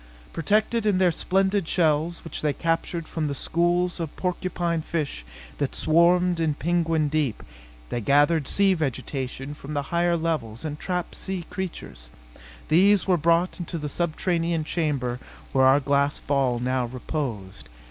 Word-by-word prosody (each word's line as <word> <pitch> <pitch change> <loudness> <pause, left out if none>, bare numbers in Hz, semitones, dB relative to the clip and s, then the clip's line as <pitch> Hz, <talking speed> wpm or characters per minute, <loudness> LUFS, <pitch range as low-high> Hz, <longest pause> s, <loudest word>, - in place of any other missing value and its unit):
Protected 215 +6 +1
in 200 -3 +3
their 185 -2 +4
spined 190 +2 +1
shells, 160 0 +1
which 165 - -6
they 150 -2 +1
captured 165 +1 -2
from 160 -2 -2
the 140 - -3
schools 175 +4 +1
of 165 -3 -4
porcupine 175 -2 -1
fish 155 - -3 0.4
that 140 -2 -1
swarmed 175 +2 +3
in 155 -3 +1
Penguin 165 -1 +1
Deep, 145 -5 -1 0.5
they 120 - -2
gathered 145 +5 +3
sea 195 -1 +3
vegetation 135 -3 -3
from 150 0 -8
the 145 - 0
higher 170 0 +2
levels 155 -8 -2
and 150 -1 -4
trapped 180 -2 -3
sea 190 -3 -4
creatures. 180 - -6 0.6
These 195 +4 +4
were 185 - +3
brought 170 +3 +2
into 175 0 -4
the 150 -2 -4
subterranean 170 0 -1
chamber 140 -7 -1 0.3
where 130 -1 +4
our 135 +2 +6
glass 140 0 +1
ball 135 -4 +1
now 125 +1 0
reposed. 120 - -5
160 Hz, 145 wpm, -25 LUFS, 140-175 Hz, 0.6 s, our